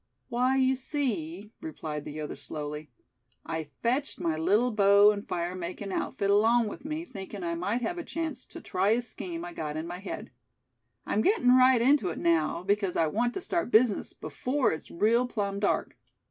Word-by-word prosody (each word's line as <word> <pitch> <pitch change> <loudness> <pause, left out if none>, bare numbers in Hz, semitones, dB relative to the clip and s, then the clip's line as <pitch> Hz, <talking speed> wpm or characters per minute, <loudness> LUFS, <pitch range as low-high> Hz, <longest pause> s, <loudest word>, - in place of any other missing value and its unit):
"Why, 255 +2 +2
you 260 0 +4
see," 215 - -2
replied 155 -1 -5
the 150 +1 -6
other, 150 - -5
slowly, 150 0 -6 0.6
"I 160 -1 -3 0.2
fetched 260 +5 0
my 165 -3 0
little 210 +10 +2
bow 200 0 +6
and 205 0 -5
fire 175 0 -2
makin' 185 +2 -5
outfit 200 +1 -1
along 225 +2 +4
with 265 - -10
me, 310 +2 -3
thinkin' 195 - -8
I 170 0 -1
might 200 +8 -1
have 350 +5 -2
a - - -4
chance 320 -7 -4
to - - -10
try 190 +2 0
a 240 +1 0
scheme 175 -7 -6
I 175 - -7
got 155 -2 -4
in 160 - -3
my 175 +1 -6
head. 200 - -7 0.7
I'm 215 - +1
gettin' 250 - +4
right 255 -1 +6
into 250 -5 +3
it 165 - -5
now, 170 0 +1
because 200 -1 0
I 165 - +4
want 235 +10 0
to 385 - -3
start 340 -6 -1
business 225 -2 +3
before 260 0 -1
it's 160 - -5
real 230 +7 +2
plumb 200 -4 -2
dark!" 200 - 0
205 Hz, 190 wpm, -28 LUFS, 170-250 Hz, 0.7 s, bow